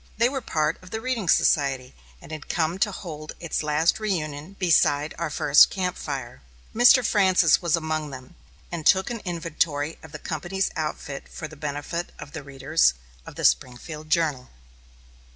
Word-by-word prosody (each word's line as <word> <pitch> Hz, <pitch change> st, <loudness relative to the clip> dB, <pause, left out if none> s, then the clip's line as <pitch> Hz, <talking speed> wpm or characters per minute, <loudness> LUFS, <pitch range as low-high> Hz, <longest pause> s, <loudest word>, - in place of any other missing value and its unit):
They 235 Hz, +2 st, +4 dB
were 270 Hz, 0 st, -3 dB
part 155 Hz, -7 st, -1 dB
of 185 Hz, -, -13 dB
the 220 Hz, -, -4 dB
reading 230 Hz, -6 st, -2 dB
society, 135 Hz, -4 st, +2 dB, 0.3 s
and -, -, -13 dB
had 155 Hz, -1 st, -8 dB
come 170 Hz, +2 st, 0 dB
to 205 Hz, -, +2 dB
hold 155 Hz, -5 st, -7 dB
its 170 Hz, -3 st, -2 dB
last 155 Hz, +4 st, +1 dB
reunion 160 Hz, -5 st, -3 dB
beside 155 Hz, -4 st, +2 dB
our 170 Hz, -2 st, -1 dB
first 150 Hz, 0 st, +6 dB
camp 185 Hz, -2 st, -2 dB
fire. 130 Hz, -, -6 dB, 0.3 s
Mr. 245 Hz, +2 st, +6 dB
Francis 185 Hz, -7 st, +4 dB
was 170 Hz, -3 st, +2 dB
among 155 Hz, -2 st, -2 dB
them, 130 Hz, -2 st, -10 dB, 0.4 s
and 170 Hz, -2 st, -4 dB
took 190 Hz, +7 st, +4 dB
an 230 Hz, -3 st, -5 dB
inventory 165 Hz, -3 st, -2 dB
of -, -, -13 dB
the -, -, -6 dB
company's 175 Hz, +5 st, -2 dB
outfit 150 Hz, -3 st, -5 dB
for 155 Hz, -, -7 dB
the 160 Hz, -, -13 dB
benefit 150 Hz, +4 st, -4 dB
of 145 Hz, -, -10 dB
the 160 Hz, -, -6 dB
readers 135 Hz, -, +1 dB, 0.3 s
of -, -, -10 dB
The -, -, -2 dB
Springfield 150 Hz, +5 st, 0 dB
Journal. 155 Hz, -6 st, 0 dB
155 Hz, 170 wpm, -25 LUFS, 145-180 Hz, 0.4 s, first